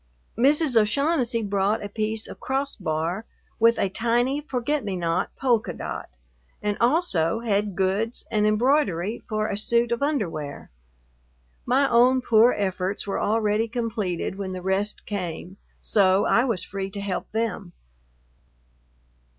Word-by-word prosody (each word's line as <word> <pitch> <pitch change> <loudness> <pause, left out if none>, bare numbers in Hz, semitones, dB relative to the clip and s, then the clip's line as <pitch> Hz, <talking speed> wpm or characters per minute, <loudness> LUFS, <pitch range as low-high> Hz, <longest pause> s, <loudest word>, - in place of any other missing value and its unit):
Mrs. 280 +3 +3
O'Shaughnessy 240 +1 +2
brought 200 +1 0
a - - -3
piece 215 +1 -2
of - - -10
crossbar 195 - -2 0.3
with 230 +1 +5
a - - +1
tiny 240 +7 0
forget 285 +1 -2
me 195 -2 -3
not 170 -2 -1
polka 240 -5 +1
dot, - - -6 0.5
and 210 0 -1
also 235 - +2
had 205 -3 0
goods 195 +5 -1
and 210 -1 +2
embroidery 215 - +1
for 215 -1 0
a 200 - -2
suit 235 +3 +1
of 235 - -1
underwear. 180 - -2 1.0
My 270 +3 +3
own 250 +2 +4
poor 230 +1 +5
efforts 190 -1 -2
were 200 - -2
already 215 +1 +1
completed 220 -6 -3
when 190 -1 -4
the 185 -1 -6
rest 195 +2 -1
came, 185 -1 -5 0.2
so 195 -1 +3
I 240 - +3
was 225 -9 -1
free 195 0 -5
to 200 +1 -6
help 200 -2 -4
them. 220 -5 -3
215 Hz, 135 wpm, -24 LUFS, 195-240 Hz, 1.0 s, with